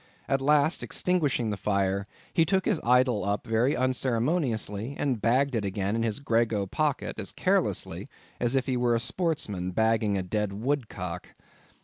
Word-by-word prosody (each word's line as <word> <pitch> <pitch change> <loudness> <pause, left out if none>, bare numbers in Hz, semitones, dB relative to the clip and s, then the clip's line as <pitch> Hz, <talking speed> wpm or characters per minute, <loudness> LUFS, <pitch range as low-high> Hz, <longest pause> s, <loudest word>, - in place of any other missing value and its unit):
At 135 0 +1
last 150 +3 +3
extinguishing 145 -11 0
the 105 - -3
fire, 100 -1 0 0.3
he 165 - +4
took 190 +3 +1
the 195 -6 +1
idol 125 -3 +3
up 100 +2 -1
very 115 +5 +2
unceremoniously, 125 - 0
and 130 -7 -1
bagged 130 +4 +2
it 115 -3 0
again 100 +1 -1
in 115 - 0
his 115 +1 -1
grego 115 -6 +1
pocket 150 +8 -2
as - - -3
carelessly - - 0 0.3
as 120 +2 +1
if 130 - +1
he 130 - -1
were 120 -1 +2
a - - +1
sportsman 120 - -1
bagging 110 +1 +1
a 95 - -1
dead 105 +2 -2
woodcock. 105 -7 -3
115 Hz, 160 wpm, -27 LUFS, 105-135 Hz, 0.3 s, he